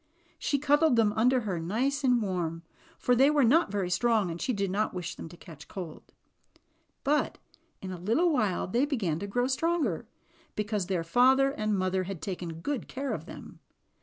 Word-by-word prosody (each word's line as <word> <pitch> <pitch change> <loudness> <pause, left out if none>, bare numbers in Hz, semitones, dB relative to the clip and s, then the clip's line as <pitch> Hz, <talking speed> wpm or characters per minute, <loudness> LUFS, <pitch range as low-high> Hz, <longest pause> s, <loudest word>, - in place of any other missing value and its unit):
She 285 - 0
cud 290 +1 +3
dled 315 -5 +4
them 220 -3 +3
under 250 +4 +3
her, 195 -6 -2
nice 255 - -1
and 245 -3 +3
warm, 170 -4 -2 0.3
for 250 - +2
they 270 +4 +5
were 295 -2 +3
not 300 +6 +4
very 195 -3 -1
strong 215 -2 +2
and 165 - -6
she 260 - 0
did 200 -4 -1
not 210 0 -1
wish 175 -2 -4
them - - -9
to 175 - -13
catch 155 -4 -13
cold. 175 -5 -8 0.9
But 295 +1 +1 0.5
in 190 - -5
a 180 - -6
little 245 - +2
while 215 -9 +1
they 240 +9 +1
began 200 - -1
to 200 - -4
grow 245 +5 0
stronger, 265 - 0 0.5
because 210 -3 -2
their 185 -3 -1
father 260 +9 +4
and 215 -6 -1
mother 185 0 0
had 195 -2 -5
taken 175 -3 -5
good 285 +5 -3
care 275 +1 -3
of - - -6
them. - - -11
215 Hz, 190 wpm, -29 LUFS, 185-265 Hz, 0.9 s, they